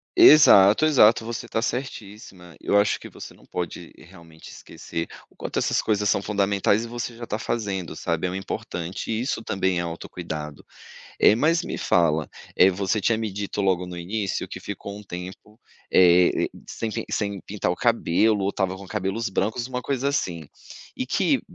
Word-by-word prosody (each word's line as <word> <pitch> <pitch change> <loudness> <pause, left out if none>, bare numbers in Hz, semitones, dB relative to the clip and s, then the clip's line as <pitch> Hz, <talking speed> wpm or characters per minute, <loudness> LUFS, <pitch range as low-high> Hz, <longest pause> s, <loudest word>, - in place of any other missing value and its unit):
Exato, 150 - +8
exato. 115 -7 +5
Você 115 0 -5
está 115 - -2
certíssima. 105 -8 -6
Eu 100 - +1
acho 100 - +1
que - - -10
você - - -10
não - - -21
pode, 90 -2 -6
realmente, 80 -1 -15
esquecer 85 0 -7 0.2
o - - -27
quanto - - -3
essas - - +1
coisas 105 -1 0
são - - +2
fundamentais. 100 +1 +1
E - - -6
você 120 0 -5
já 120 - -10
está 105 - -3
fazendo, 100 -7 -3
sabe, 85 +2 -2
é 90 - -4
importante 90 0 -5
e 110 0 -1
isso 125 -3 -2
também 95 -3 0
é - - 0
autocuidado. 85 -3 -6 0.5
Eh, - - +6
mas 165 +8 +2
me - - -5
fala, 80 -3 +2 0.3
eh, 95 - +6
você 100 +3 -1
tinha 115 +3 +2
me 110 -2 -3
dito 100 +1 -5
logo 95 -2 +1
no 90 0 -7
início 100 +3 -3
que - - -8
ficou 100 - -7
um - - -12
tempo, 95 +4 -9 0.3
eh, 90 0 +5 0.2
sem 115 - -4
pi 115 +1 -4
sem 100 -2 -2
pintar 100 -3 -2
o - - -2
cabelo 110 -2 +2
ou 95 - +1
estava 95 -2 -1
com 100 0 -11
cabelos 105 +3 -2
brancos, 110 +5 -1
uma 125 -1 -4
coisa 135 +1 -1
assim. 85 - -2 0.5
E - - -3
que, - - +1
100 Hz, 180 wpm, -24 LUFS, 90-115 Hz, 0.5 s, Exato